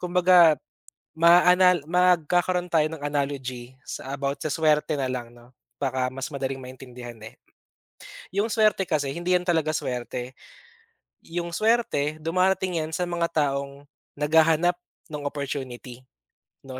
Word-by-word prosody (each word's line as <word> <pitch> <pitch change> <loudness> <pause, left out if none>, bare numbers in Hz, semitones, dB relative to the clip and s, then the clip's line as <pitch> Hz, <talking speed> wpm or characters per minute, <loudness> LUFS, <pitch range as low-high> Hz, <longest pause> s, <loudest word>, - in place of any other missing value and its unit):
Kumbaga, 180 -3 +5 0.6
maa-anal 180 0 +5
magkakaroon 180 0 +2
tayo 155 -2 +3
ng 150 - -8
analogy, 135 -4 -3
sa 135 +2 -6
about, 140 0 -3
sa - - -3
suwerte 155 -1 +2
na 130 -2 -2
lang, 120 -2 -6
'no, 120 +1 -18 0.2
baka 130 -2 -1
mas 130 +3 -6
madaling 135 -1 -4
maintindihan, 125 -2 -10
eh. 110 +1 -11 1.0
Yung 200 +3 0
suwerte 215 -4 +2
kasi, 145 -4 -1
hindi 175 +5 -1
yan 180 - +2
talaga 160 -3 0
suwerte, 125 -1 -4 0.9
yung 170 +1 -4
suwerte, 170 -8 0
dumarating 185 +1 +1
yan 160 - -7
sa 180 - -2
mga 175 -1 -1 0.2
taong 140 0 -5 0.3
naghahanap 160 +3 +3 0.3
no'ng 150 -1 -5
opportunity, 130 -3 -6 0.6
'no. 130 -1 -8
150 Hz, 130 wpm, -25 LUFS, 135-175 Hz, 1.0 s, Kumbaga